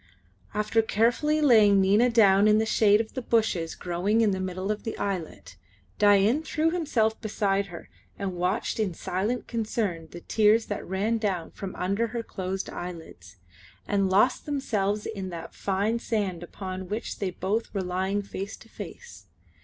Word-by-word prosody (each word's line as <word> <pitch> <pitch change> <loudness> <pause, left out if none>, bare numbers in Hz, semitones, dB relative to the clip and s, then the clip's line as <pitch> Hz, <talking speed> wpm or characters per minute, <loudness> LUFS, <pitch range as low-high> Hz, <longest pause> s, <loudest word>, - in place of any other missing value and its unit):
After 215 +2 +2
carefully 240 +8 +1
laying 215 -8 +6
Nina 205 +6 +4
down 205 -3 +5
in 210 0 +5
the 220 - +2
shade 210 -1 +4
of 220 -1 -3
the 260 - -3
bushes 215 -8 0
growing 185 +6 0
in 215 -2 +3
the 190 - -2
middle 185 +2 -3
of 210 - -3
the 225 - -5
islet, 165 - -4 0.4
Dain 205 +7 +5
threw 320 0 0
himself 240 -11 0
beside 200 -2 0
her 170 -3 -10 0.3
and 195 -2 -3
watched 180 +6 -1
in 195 -6 0
silent 205 +10 -2
concern 210 -7 -2
the 175 - -10
tears 220 +3 +3
that 205 - -5
ran 210 +5 0
down 190 -6 -2
from 195 -2 -7
under 200 +5 0
her 230 +1 -4
closed 190 -2 -4
eyelids, 160 - -8 0.5
and 195 -2 +1
lost 210 +10 +3
themselves 210 -8 -1
in 195 -4 -5
that 170 -2 -8
fine 205 +4 -1
sand 205 -8 -2
upon 185 +1 -7
which 215 +2 -4
they 195 - -1
both 195 +5 -2
were 195 -2 -2
lying 190 +3 -1
face 200 +1 -6
to - - -17
face. 480 0 -10
205 Hz, 165 wpm, -27 LUFS, 185-225 Hz, 0.5 s, laying